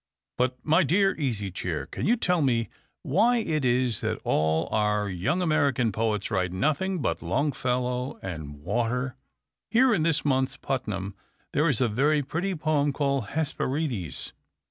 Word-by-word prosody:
But, 125 0 0
my 160 +4 +4
dear 195 +2 +3
Easy 110 -9 -1
Chair, 80 -6 -3
can - - -4
you 235 - +5
tell 180 -7 +1
me 120 -6 +1 0.3
why 230 - +3
it 155 - -1
is 125 -2 +1
that - - -2
all 80 +1 +1
our 105 -1 +1
young 100 - 0
American 140 -8 +2
poets 110 -1 -1
write 90 -3 0
nothing 155 - 0
but - - -1
Longfellow 125 -2 -1
and 75 -5 -7
water? 125 - -1 0.5
Here 245 +1 +4
in 175 - +1
this 160 -2 +1
month's 130 -2 +1
Putnam 100 -7 -3 0.4
there 150 +3 +3
is 130 -5 +1
a 125 - +4
very 145 +7 +2
pretty 180 +7 -2
poem 150 -2 +1
called 140 -5 0
'Hesperides.' 140 - -2
130 Hz, 150 wpm, -27 LUFS, 105-155 Hz, 0.5 s, you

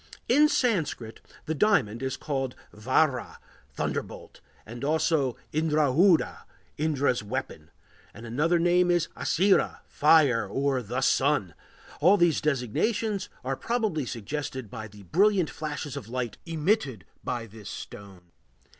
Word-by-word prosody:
In 295 +5 +5
Sanskrit 160 - -1 0.2
the 160 - -1
diamond 145 - +2
is 130 0 -2
called 135 -4 -3 0.2
vajra, 130 +4 +1 0.4
"thunderbolt," - - -5 0.2
and 120 +4 -9
also 150 -3 +1 0.2
indrâjudha, 155 +3 +3 0.4
"Indra's 145 -5 +1
weapon"; 105 -8 -5 0.4
another 145 +10 0
name 175 +1 +3
is 175 -2 +2
açira, 190 +4 +2
"fire," 145 -8 +4
or 135 +5 0
"the 125 +4 -3
Sun." 135 - +2 0.5
All 185 +6 +5
these 175 -4 +3
designations 195 - -1
are 135 +1 -2
probably 215 - -1
suggested 130 0 -5
by 110 -3 -6
the 105 -1 -14
brilliant 190 - +2
flashes 150 -2 -5
of 110 - -7
light 120 -3 -4
emitted 155 - 0 0.2
by 120 -2 -3
this 110 -1 -11
stone. 95 -4 -10
140 Hz, 120 wpm, -27 LUFS, 120-165 Hz, 0.5 s, In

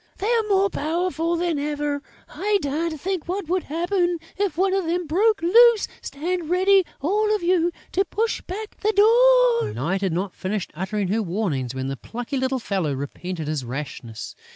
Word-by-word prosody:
They 420 +5 -1
are 465 - +3
more 395 0 +3
powerful 335 +1 -1
than 340 -3 0
ever! 290 0 -2 0.3
I 415 +1 0
daren't 315 +1 -2
think 370 0 -3
what 370 0 -3
would 365 +1 0
happen, 350 +2 0 0.2
if 385 -5 -1
one 380 +1 +2
of 385 -2 0
them 350 +2 -1
broke 400 +6 +2
loose! 460 +4 +6
Stand 335 +3 -3
ready, 380 +2 +4 0.2
all 420 +7 +2
of 415 - -4
you, 350 -1 +2 0.2
to 385 - +2
push 440 +4 -1
back 420 +4 -7
the 430 +1 +1
door!" 480 +3 +5
Night 175 +10 -2
had 190 -2 0
not 185 +3 -2
finished 195 0 -3
uttering 190 +3 -2
her 220 +3 +1
warnings, 170 - -2
when 130 0 -3
the 135 0 -4
plucky 245 - -5
little 260 0 0
fellow 195 - -1
repented 155 +4 -5
his 150 -3 -2
rashness. 125 -3 -6
335 Hz, 175 wpm, -23 LUFS, -, 0.3 s, loose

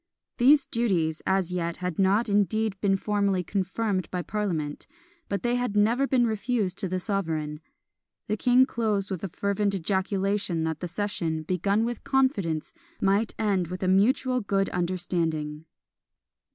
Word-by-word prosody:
These 275 +3 +6
duties 175 -9 0
as 190 -2 +1
yet 170 -2 -2
had 180 -2 -4
not 200 +5 +3
indeed 210 +1 +1
been 195 -2 +3
formally 200 -2 0
confirmed 190 +1 -1
by 180 -1 -3
parliament, 170 -9 -3 0.4
but 200 -2 -2
they 240 +1 +1
had 245 -4 -1
never 235 +6 +3
been 250 -3 +3
refused 220 -3 -1
to 195 - -1
the 185 +1 -2
sovereign. 160 -7 -2 0.7
The 215 - 0
king 250 +3 +4
closed 210 -5 -1
with 185 -2 -4
a 195 - -2
fervent 200 +2 0
ejaculation 190 -1 0
that 160 -1 -2
the 180 - -4
session, 170 -4 -2
begun 195 +6 +1
with 240 0 -4
confidence, 205 - 0 0.3
might 200 +3 +1
end 195 -5 +1
with 185 +2 -5
a - - +1
mutual 250 +6 +3
good 195 -1 0
understanding. 165 -4 -2
195 Hz, 150 wpm, -27 LUFS, 180-215 Hz, 0.7 s, These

